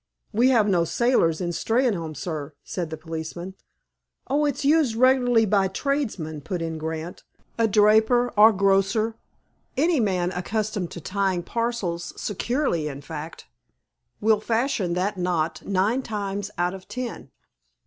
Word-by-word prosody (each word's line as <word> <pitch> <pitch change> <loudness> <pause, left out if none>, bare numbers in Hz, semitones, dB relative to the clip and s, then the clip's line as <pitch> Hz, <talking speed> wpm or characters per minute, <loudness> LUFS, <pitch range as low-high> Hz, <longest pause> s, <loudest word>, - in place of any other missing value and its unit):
"We 240 +4 +4
have 225 -5 +4
no 180 -4 +3
sailors 170 -5 +2
in 175 -1 -1
Steynholme, 185 - 0
sir," 150 -2 -5
said 175 -4 -4
the 160 - -5
policeman. 165 +3 -6 0.7
"Oh, 295 +2 +1
it's 285 -1 -1
used 290 -5 +3
regularly 245 -2 +4
by 200 -1 +2
tradesmen," 190 - -2
put 180 +5 -4
in 165 -1 -4
Grant. 160 +2 -5 0.4
"A 225 - +4
draper, 220 +4 +4
or 215 +2 +8
grocer—any 220 - 0
man 185 -5 +1
accustomed 200 0 -2
to 170 - -8
tying 190 0 -1
parcels 205 -7 -3
securely, 210 - -1
in 140 -1 -6
fact—will 150 - -5
fashion 225 -6 0
that 190 +2 -1
knot 170 -3 -1
nine 200 +6 +1
times 205 -4 -4
out 175 +1 0
of 190 -1 -10
ten." 250 -1 -6
195 Hz, 130 wpm, -24 LUFS, 170-230 Hz, 0.7 s, or